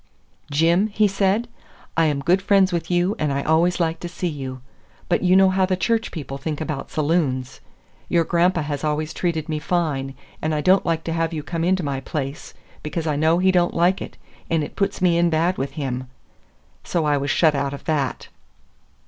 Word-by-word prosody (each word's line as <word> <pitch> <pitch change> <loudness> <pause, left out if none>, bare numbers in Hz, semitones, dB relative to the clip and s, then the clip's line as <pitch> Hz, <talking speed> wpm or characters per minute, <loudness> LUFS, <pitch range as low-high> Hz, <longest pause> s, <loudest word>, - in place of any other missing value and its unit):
"Jim," 165 +7 +3
he 215 0 +2
said, 200 +3 +1 0.5
"I 165 - +3
am 145 -3 0
good 180 +7 +2
friends 195 -1 +3
with 170 - -2
you 180 +3 +1
and 150 -2 0
I 140 0 -1
always 170 +3 +2
like 165 -1 0
to 175 - -6
see 180 +1 -3
you. 135 -5 -5 0.5
But - - +1
you 185 0 +4
know 190 0 +6
how 185 0 +2
the 185 -1 0
church 225 +4 0
people 140 -4 -6
think 150 +1 -4
about 155 -3 -4
saloons. 145 -5 -1 0.5
Your 170 -1 +3
grandpa 170 0 +2
has 145 -1 -4
always 155 0 -1
treated 165 -3 -2
me 155 -1 -2
fine, 150 -5 -1 0.3
and 155 0 0
I 150 - 0
don't 185 +4 +3
like 165 -1 0
to 165 - -3
have 165 0 -1
you 155 -2 -4
come 165 +1 -3
into 185 +1 +1
my 140 -2 -2
place, 140 0 -5 0.3
because 160 +2 -4
I 150 -2 0
know 160 +3 +3
he 185 +1 +3
don't 175 -1 +2
like 175 +3 +2
it, - - -8 0.3
and 165 -2 +1
it - - -7
puts 195 -2 -1
me 170 -2 +4
in 170 0 +3
bad 170 +3 +1
with 135 +1 -3
him." 130 -3 -4 0.8
So 165 -3 -1
I 145 -1 +2
was 140 +1 -2
shut 155 +2 +4
out 140 -1 -1
of - - -12
that. 145 -5 -1
165 Hz, 210 wpm, -22 LUFS, 145-180 Hz, 0.8 s, know